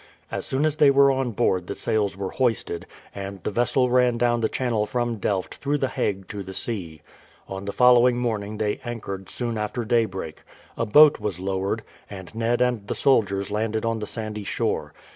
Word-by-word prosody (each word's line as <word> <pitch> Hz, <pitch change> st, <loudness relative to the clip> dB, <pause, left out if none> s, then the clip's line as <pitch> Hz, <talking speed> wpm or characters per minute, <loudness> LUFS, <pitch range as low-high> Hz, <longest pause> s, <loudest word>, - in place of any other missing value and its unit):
As -, -, -3 dB
soon 135 Hz, +3 st, +1 dB
as 155 Hz, -1 st, 0 dB
they 145 Hz, -, +6 dB
were 140 Hz, 0 st, +6 dB
on 135 Hz, -2 st, 0 dB
board 90 Hz, -5 st, 0 dB
the -, -, -4 dB
sails 105 Hz, -3 st, 0 dB
were 95 Hz, -1 st, -4 dB
hoisted, 115 Hz, -9 st, -1 dB, 0.3 s
and 100 Hz, -2 st, -7 dB
the -, -, -2 dB
vessel 120 Hz, +3 st, +1 dB
ran 125 Hz, -1 st, +3 dB
down 120 Hz, 0 st, +2 dB
the 110 Hz, -, +1 dB
channel 115 Hz, -5 st, -1 dB
from 120 Hz, -1 st, -1 dB
Delft 95 Hz, -1 st, -2 dB
through 145 Hz, +1 st, -1 dB
the 135 Hz, -2 st, -1 dB
Hague 95 Hz, -6 st, -2 dB
to 105 Hz, -, -5 dB
the 95 Hz, 0 st, -7 dB
sea. 85 Hz, -9 st, -3 dB, 0.4 s
On 95 Hz, +1 st, -6 dB
the 100 Hz, -, -3 dB
following 125 Hz, +1 st, +5 dB
morning 110 Hz, -3 st, -2 dB
they 105 Hz, -1 st, -1 dB
anchored 100 Hz, -5 st, -6 dB
soon 120 Hz, -3 st, -3 dB
after 110 Hz, +3 st, -3 dB
daybreak. 110 Hz, -9 st, -1 dB, 0.3 s
A 115 Hz, -, -2 dB
boat 150 Hz, +7 st, +7 dB
was 105 Hz, -5 st, -3 dB
lowered, 95 Hz, +3 st, -2 dB, 0.3 s
and 95 Hz, -2 st, -9 dB
Ned 115 Hz, +2 st, 0 dB
and 120 Hz, -5 st, -1 dB
the -, -, -2 dB
soldiers 100 Hz, -7 st, +2 dB
landed 110 Hz, +1 st, -1 dB
on 115 Hz, -1 st, 0 dB
the 105 Hz, -, -4 dB
sandy 110 Hz, -2 st, -4 dB
shore. -, -, -2 dB
110 Hz, 195 wpm, -24 LUFS, 100-120 Hz, 0.4 s, boat